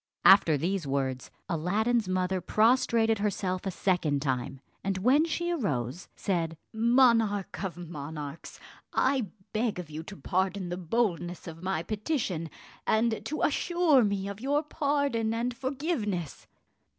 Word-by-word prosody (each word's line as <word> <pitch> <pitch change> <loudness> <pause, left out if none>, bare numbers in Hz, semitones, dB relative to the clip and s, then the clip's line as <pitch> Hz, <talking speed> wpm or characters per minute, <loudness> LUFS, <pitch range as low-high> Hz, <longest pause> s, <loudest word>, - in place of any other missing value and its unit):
After 170 -6 +7
these 175 +1 -1
words, 135 -2 -2 0.2
Aladdin's 205 +7 +1
mother 185 0 0
prostrated 225 +1 +3
herself 195 -2 -1
a - - +1
second 170 -7 0
time; 130 -1 -2 0.2
and 195 0 -1
when 260 - +4
she 345 +1 -1
arose, 150 - -2
said, 165 -4 -1 0.2
"Monarch 230 -4 +3
of 185 -3 -4
monarchs, 155 -3 -7 0.4
I 260 -4 +2 0.3
beg 220 -1 0
of 175 -4 -7
you 155 +1 -5
to 195 +4 -10
pardon 190 0 -1
the 175 - -3
boldness 175 -2 -1
of 165 -1 -8
my 185 -3 -1
petition, 210 - -2 0.4
and 220 0 +2
to 305 - -2
assure 315 -3 +3
me 200 -2 -1
of 200 +1 -6
your 290 +3 +1
pardon 280 -7 0
and 240 +1 -1
forgiveness." 255 - -3
200 Hz, 135 wpm, -29 LUFS, 170-235 Hz, 0.4 s, After